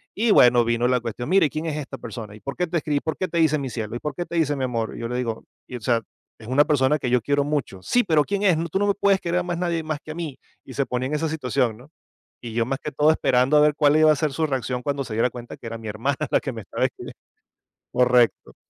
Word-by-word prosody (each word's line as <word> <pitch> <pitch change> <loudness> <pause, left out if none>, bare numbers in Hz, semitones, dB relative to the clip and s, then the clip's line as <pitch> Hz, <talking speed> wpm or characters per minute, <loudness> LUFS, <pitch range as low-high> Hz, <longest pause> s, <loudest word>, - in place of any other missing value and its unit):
Y 225 +1 +2
bueno, 120 -7 +6
vino 120 +1 +1
la 125 0 +2
cuestión. 120 +1 -5
"Mira 190 -2 +5
y, - - 0
¿quién 155 +3 -4
es 160 -3 -2
esta 135 -2 -6
persona? 110 -6 -8
¿Y - - -13
por 140 +5 -6
qué 180 - -1
te 170 +1 -1
escribe? 150 -2 -1
Y, - - +2
¿por 160 -3 -3
qué 185 - -1
te 170 - -4
dice 155 -2 +3
mi 140 -3 -4
cielo? 115 -1 -5
Y, - - -3
¿por 150 +2 -4
qué 175 - -3
te 170 - -7
dice 150 -3 +1
mi 135 - -3
amor?", 115 -3 -2
y - - -8
yo 115 - -2
le 125 - -4
digo: 115 -3 -3 0.3
"O - - -10
sea, 115 +1 +1 0.4
es 110 - -13
una 130 +4 +4
persona 145 -1 +2
que 125 - -2
yo 125 0 +3
quiero 145 +4 +1
mucho". 145 -9 -2
"Sí, 245 - +2
pero 160 -7 +3
¿quién 200 +5 -2
es? 180 -5 +4
Tú 190 - 0
no 205 - +1
me 200 - +3
puedes 200 -1 +2
querer 175 0 0
a - - -2
más 175 -1 -3
nadie 170 -2 -1
más 155 -1 -3
que 155 - -8
a - - -7
mí", 160 -6 -5 0.3
y 130 - -10
se 140 - 0
ponía 125 0 -2
en 150 - -2
esa 160 +1 -1
situación, 125 -6 -1
¿no? 125 +5 -16 0.5
Y 120 -2 -7
yo 115 0 +1
más 135 +1 -2
que 150 - -5
todo 150 +3 +4
esperando 130 -1 +2
a - - +7
ver 150 0 +4
cuál 150 -1 +4
iba 155 0 +6
a - - 0
ser 150 0 -1
su 160 +3 0
reacción 130 -3 -2
cuando 140 +1 -2
se 120 - -8
diera 115 +3 +2
cuenta 120 0 -9
que - - -12
era 115 0 -5
mi 110 - -10
hermana 115 +7 -1
la - - +3
que 135 - -4
me 115 -2 -7
estaba - - -2
escribi - - -4 0.8
Correcto. 125 -1 +2
140 Hz, 300 wpm, -23 LUFS, 120-155 Hz, 0.8 s, a